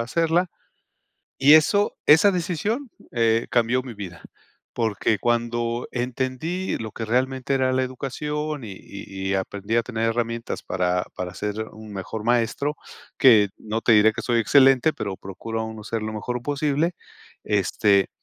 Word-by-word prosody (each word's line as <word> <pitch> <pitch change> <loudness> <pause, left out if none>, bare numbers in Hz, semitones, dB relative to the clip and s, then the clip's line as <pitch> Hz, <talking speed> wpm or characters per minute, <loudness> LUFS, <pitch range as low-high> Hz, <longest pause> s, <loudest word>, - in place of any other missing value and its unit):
hacerla, 165 +7 +1 0.9
y 140 +3 +7
eso 200 +7 +3
esa 160 +7 +7
decisión, 205 - -2 0.2
eh, 115 -1 +2
cambió 120 +2 +2
mi 125 -3 -8
vida, 90 -5 -8 0.5
porque 110 -1 0
cuando 120 0 -1
entendí 130 +9 -2
lo 110 -1 -6
que 115 - -6
realmente 130 +3 0
era 130 -1 +1
la 130 - +2
educación 150 +3 -4
y 100 -3 -7
y 95 0 -7
y - - +1
aprendí 100 +3 -2
a 115 - +4
tener 115 -1 -3
herramientas 115 0 -3
para 90 0 0
para 90 -1 -5
ser 105 +2 -4
un 110 -1 -11
mejor 105 +3 -5
maestro, 120 +5 +1 0.4
que 110 -6 +6
no 110 +1 -4
te 115 - +4
diré 110 +1 +5
que - - -5
soy 120 -1 +1
excelente, 135 +4 +5
pero 100 -2 -5
procura 110 +4 -5
uno 110 -1 -7
ser 110 0 -3
lo 110 0 -4
mejor 120 +3 -4
posible, 145 +3 0 0.6
este, 100 -1 +2
120 Hz, 150 wpm, -24 LUFS, 110-135 Hz, 0.9 s, y